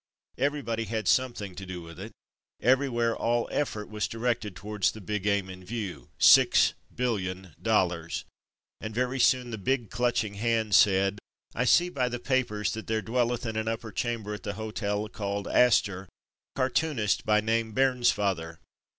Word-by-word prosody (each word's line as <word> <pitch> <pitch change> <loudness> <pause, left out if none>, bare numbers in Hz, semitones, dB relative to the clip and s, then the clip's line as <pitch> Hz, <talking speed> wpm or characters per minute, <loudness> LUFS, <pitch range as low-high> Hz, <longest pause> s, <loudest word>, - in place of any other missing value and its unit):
Everybody 130 -5 -1
had 110 -1 -3
something 120 -7 +1
to 95 - -8
do 90 -2 -7
with 85 -1 -11
it. - - -7 0.5
Everywhere 120 -2 +2
all 120 0 0
effort 110 -8 -2
was 105 -1 -2
directed 115 -4 -2
towards 105 0 -1
the 110 - -9
big 105 0 -3
aim 100 -2 +1
in 95 -1 -10
view 95 - -6
— - - -40
"Six - - +6 0.2
billion 95 -8 -2
dollars," 90 -7 0 0.5
and 110 0 -6
very 125 +2 -1
soon 125 -1 +3
the 110 - -5
Big 120 +1 -1
Clutching 120 -3 0
Hand 110 0 0
said, 100 0 +4 0.4
''I 125 +1 0
see 175 +8 +5
by 130 -7 -1
the 120 - -3
papers 105 -8 0
that 110 - -6
there 110 -1 -1
dwelleth 120 0 0
in 110 -1 -3
an 110 0 -2
upper 115 0 -3
chamber 115 -2 -3
at 105 - -7
the 100 - -4
Hotel 105 -1 -3
called 100 -1 -4
Astor, 100 -5 +3
a - - -24 0.5
cartoonist 130 -4 0
by 105 0 +3
name 110 +1 0
Bairns 125 -1 +3
father. 85 -5 -2
110 Hz, 165 wpm, -28 LUFS, 100-120 Hz, 0.5 s, Six